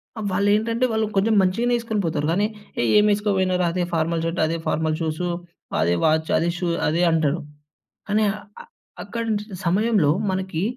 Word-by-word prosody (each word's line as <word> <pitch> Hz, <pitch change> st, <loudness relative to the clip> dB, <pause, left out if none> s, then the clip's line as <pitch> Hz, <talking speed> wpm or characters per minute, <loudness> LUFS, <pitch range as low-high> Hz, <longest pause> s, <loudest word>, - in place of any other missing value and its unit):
ఆ! 220 Hz, -, -7 dB
వాళ్లేంటంటే 215 Hz, +5 st, +2 dB
వాళ్ళు 220 Hz, 0 st, +1 dB
కొంచెం 220 Hz, +3 st, +3 dB
మంచిగనే 230 Hz, +7 st, +1 dB
ఏస్కుని 220 Hz, -3 st, -2 dB
పోతారు 150 Hz, -2 st, -1 dB
గానీ 205 Hz, +4 st, +2 dB, 0.3 s
ఏ -, -, +1 dB
ఏమేసుకు 210 Hz, 0 st, +3 dB
పోయినరా 185 Hz, -1 st, +1 dB
అదే 180 Hz, -1 st, 0 dB
ఫార్మల్ 165 Hz, 0 st, 0 dB
షర్ట్. 165 Hz, +2 st, -2 dB
అదే 165 Hz, +1 st, -1 dB
ఫార్మల్ 160 Hz, 0 st, 0 dB
షూస్, 160 Hz, +2 st, -2 dB, 0.6 s
అదే 85 Hz, +2 st, +2 dB
వాచ్, 160 Hz, 0 st, +2 dB
అదే 170 Hz, -, +1 dB
షూ. 180 Hz, -, -2 dB, 0.2 s
అదే 165 Hz, +3 st, +1 dB
అంటాడు. 160 Hz, 0 st, +1 dB, 0.7 s
అని 215 Hz, +1 st, +3 dB
ఆహ్, 210 Hz, -, -9 dB, 0.6 s
అక్కడ్ 230 Hz, +3 st, -4 dB
నుంచి 210 Hz, -1 st, -1 dB, 0.2 s
సమయంలో 195 Hz, -3 st, +3 dB, 0.2 s
మనకి 190 Hz, -3 st, -2 dB
185 Hz, 160 wpm, -23 LUFS, 165-210 Hz, 0.7 s, కొంచెం